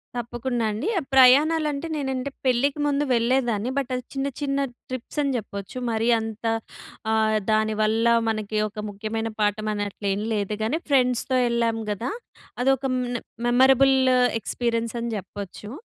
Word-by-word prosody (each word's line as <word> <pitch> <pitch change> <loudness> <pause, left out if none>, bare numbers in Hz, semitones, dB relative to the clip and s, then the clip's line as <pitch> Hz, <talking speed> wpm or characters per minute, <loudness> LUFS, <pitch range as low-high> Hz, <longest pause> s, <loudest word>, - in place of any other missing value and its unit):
తప్పకుండా 240 0 -2
అండి. 215 - -3 0.3
ప్రయాణాలంటే 295 +4 +5
నేనంటే 265 -2 -2 0.2
పెళ్ళికి 265 +3 +2
ముందు 285 0 +1
వెళ్ళేదాన్ని. 235 -2 +1
బట్ 275 -2 -1
అది 250 - -4
చిన్న 270 0 -1
చిన్న 275 -1 0 0.3
ట్రిప్స్ 255 +3 -5
అని 280 - 0
చెప్పొచ్చు. 200 0 -7
మరీ 225 +1 +1
అంత 220 0 -6 0.7
ఆహ్, 220 0 +2
దానివల్ల 215 +1 +1 0.2
మనకి 215 -1 -2
ఒక 210 +1 -7
ముఖ్యమైన 220 +2 -3
పాఠం 210 +1 0
అనట్లు 205 0 -4
ఏమి 205 +3 -3
లేదు 210 0 -1
గానీ 245 +9 0
ఫ్రెండ్స్‌తో 255 -1 +2
ఎళ్ళాం 230 -1 0
కదా! 210 - -3 0.5
అదొక 270 +1 +2
మ్ - - -1 0.4
మెమరబుల్ 265 +2 +5 0.5
ఎక్స్‌పీరియన్స్ 230 +1 -2
అని 235 0 -3
చెప్పొచ్చు. 200 +1 -8
235 Hz, 135 wpm, -24 LUFS, 215-265 Hz, 0.7 s, ప్రయాణాలంటే